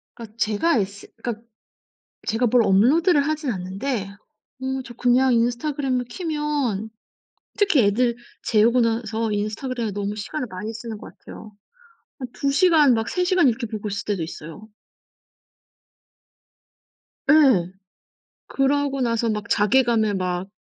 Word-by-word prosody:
그니까 225 -3 -11
제가 230 +8 +1
인스 200 -1 -4 0.2
그니까 230 -2 -4 0.9
제가 225 +3 +1
뭘 245 +1 +4
업로드를 285 - +4
하진 310 -3 -1
않는데 195 +3 -3 0.5
어 265 0 -2
저 240 - -11
그냥 250 +2 +3
인스타그램을 250 +2 0
켜면 295 - -2 0.7
특히 400 - +3
애들 235 +4 +2 0.3
재우고 235 +3 +3
나서 225 -1 -1
인스타그램에 220 +2 -3
너무 205 +1 -3
시간을 250 +7 -4
많이 210 +3 -6
쓰는 225 -1 -7
것 - - -12
같아요. 215 -1 -12 0.7
한 255 - -5
2 280 - -1
시간 310 -4 +5
막 225 0 -1
3 360 - 0
시간 360 -4 +3
이렇게 240 0 0
보고 215 -1 -5
있을 200 0 -4
때도 200 -5 -1
있어요. 165 +5 -9 2.6
예. 260 - +5 0.8
그러고 275 0 0
나서 230 -2 0
막 210 -1 -4
자괴감에 220 -1 +2
막 180 0 -2
235 Hz, 270 characters per minute, -23 LUFS, 210-275 Hz, 2.6 s, 시간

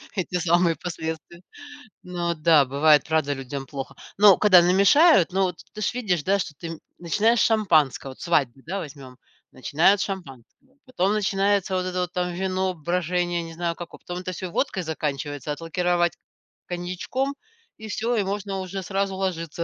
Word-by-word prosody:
эти 185 -2 -3
самые 175 0 +2
последствия. 160 0 -6 0.6
Но 175 -1 -2
да, 155 -2 +4
бывает, 145 +2 +4
правда, 155 -3 0
людям 135 0 -6
плохо. 135 0 -7 0.2
Но 200 -2 +7
когда 185 -4 +7
намешают, 195 - +5
ну 195 0 +2
вот 180 -3 -2 0.2
ты 215 - -7
же - - +1
видишь, 185 -11 -1
да, 200 +1 +2
что 165 - -4
ты, 170 - -7
м 165 -1 -7 0.2
начинаешь 210 +8 +2
с - - +5
шампанского- 160 - +2
вот - - -15
свадьбу, 135 -7 0
да, 190 +5 -3
возьмем- 135 -5 -10 0.3
начинают 165 +9 +2
с - - 0
шампанского, 190 - -9
потом 205 -6 0
начинается 200 -2 +1
вот 185 0 -1
это 185 0 -3
вот 180 0 -4
там 180 0 -1
вино, 185 0 -1
брожение, 175 +1 -1
не 165 - -9
знаю, 170 0 -2
како 175 0 -9
потом 175 0 -7
это 185 0 -5
всё 185 0 -6
водкой 195 -4 -1
заканчивается, 145 -2 -4
отлакировать 175 +2 0 0.5
коньячком 185 +11 -3 0.4
и 220 0 -9
всё, 230 +3 -1
и 210 - +1
можно 195 0 -3
уже 190 0 -5
сразу 195 0 -2
ложиться. 170 -4 -3
175 Hz, 170 wpm, -24 LUFS, 160-195 Hz, 0.6 s, Но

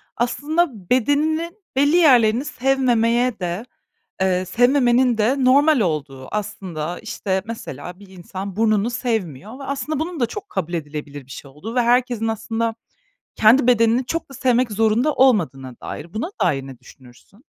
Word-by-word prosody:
aslında 265 - -1
bedeninin 310 - +1 0.2
belli 285 +4 +3
yerlerini 250 -6 +5
sevmemeye 250 -3 +1
de, 180 +4 -3 0.6
eee, 185 -1 +1
sevmemenin 245 +2 +3
de 255 +5 +1
normal 285 +1 +5
olduğu. 145 -7 -3
Aslında, 185 -6 -4
işte, 190 -1 -3
mesela, 225 -6 -8
bir 200 - -14
insan 190 +1 -8
burnunu 215 0 +2
sevmiyor 220 - -3
ve 275 - -8
aslında 280 +2 -3
bunun 325 -2 -4
da 240 - +3
çok 410 - -8
kabul 180 -3 -4
edilebilir 145 -3 -6
bir 135 - -20
şey 140 0 -9
olduğu 190 - -8
ve 250 - +3
herkesin, 240 -1 +1
aslında, 225 +1 -2 0.6
kendi 235 +4 +5
bedenini 240 +1 +3
çok 330 -2 -3
da - - -11
sevmek 245 -2 +1
zorunda 225 +7 +2
olmadığına 160 - +2
dair. 165 +3 -8
Buna 245 - -3
dair 140 -7 0
ne 135 -3 -10
düşünürsün? 130 - -19
225 Hz, 145 wpm, -21 LUFS, 185-260 Hz, 0.6 s, yerlerini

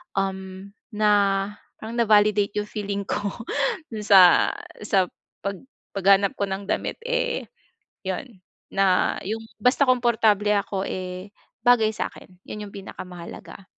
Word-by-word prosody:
Um, 190 0 -3 0.2
na 210 0 +3 0.7
parang 230 +2 -4
na-validate 210 -2 +3
yung 210 0 -2
feeling 200 -2 -3
ko 200 - -2 0.6
doon 215 -2 -5
sa 185 -4 +7 0.4
sa 190 -1 +4 0.4
pag 200 -1 -3 0.3
paghanap 195 0 +4
ko 200 - 0
ng 190 +1 -4
damit - - -1
eh - - -1 0.6
'yon 190 +2 -5 0.3
na 195 -2 +2
yung 225 +2 -3 0.2
basta 250 +5 +4
komportable 225 -5 +3
ako 195 -1 -2
eh, 185 +1 -5 0.4
bagay 235 -3 +5
sa - - -2
akin. 180 -1 -16
Yun 210 0 -6
yung - - -20
pinakamahalaga. 185 -1 -9
200 Hz, 125 wpm, -24 LUFS, 190-220 Hz, 0.7 s, sa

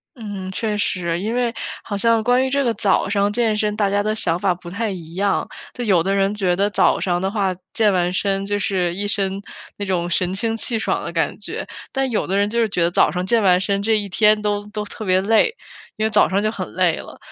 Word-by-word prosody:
嗯， 205 -5 -6
确 210 +2 -2
实， 175 -4 -1
因 215 +3 -2
为 245 -1 0 0.3
好 205 - -4
像 230 +2 +3
关 245 +3 +3
于 - - -1
这 280 +1 +1
个 235 - +1
早 215 -2 +1
上 200 0 +1
健 225 -1 +1
身， 210 0 0
大 205 -2 +2
家 205 +1 +1
的 215 +1 0
想 170 -6 +1
法 185 0 +1
不 175 0 -11
太 215 +5 -2
一 170 -4 -7
样， 200 +3 0 0.3
就 245 - -4
有 185 -6 +3
的 195 +2 0
人 195 +1 +1
觉 190 -4 +1
得 200 +3 +1
早 205 - +2
上 175 -1 0
的 190 +1 -1
话， 195 -4 0 0.2
健 215 -3 +3
完 180 -1 +1
身 195 +1 0
就 205 0 -1
是 180 -4 0
一 200 +3 -3
身 195 -1 -1 0.4
那 205 - -3
种 175 -3 -1
神 180 +1 0
清 225 +3 -1
气 230 +1 +4
爽 220 - -1
的 - - -5
感 - - -1
觉， - - -5 0.3
但 270 -1 0
有 220 - -1
的 190 - -1
人 205 0 +2
就 235 +2 -1
是 230 - +3
觉 180 -4 0
得 170 - +1
早 - - +4
上 180 0 -3
健 230 +4 +2
完 185 -3 +5
身 200 +1 0
这 220 +1 +2
一 205 -1 -3
天 210 +2 +3
都 205 0 -2
都 210 0 -3
特 210 +1 -8
别 185 -1 +3
累， 225 - +3 0.4
因 215 - -1
为 - - +2
早 - - +4
上 195 +2 0
就 215 - +1
很 - - -5
累 - - +2
了， - - -10
205 Hz, 275 characters per minute, -20 LUFS, 190-220 Hz, 0.4 s, 完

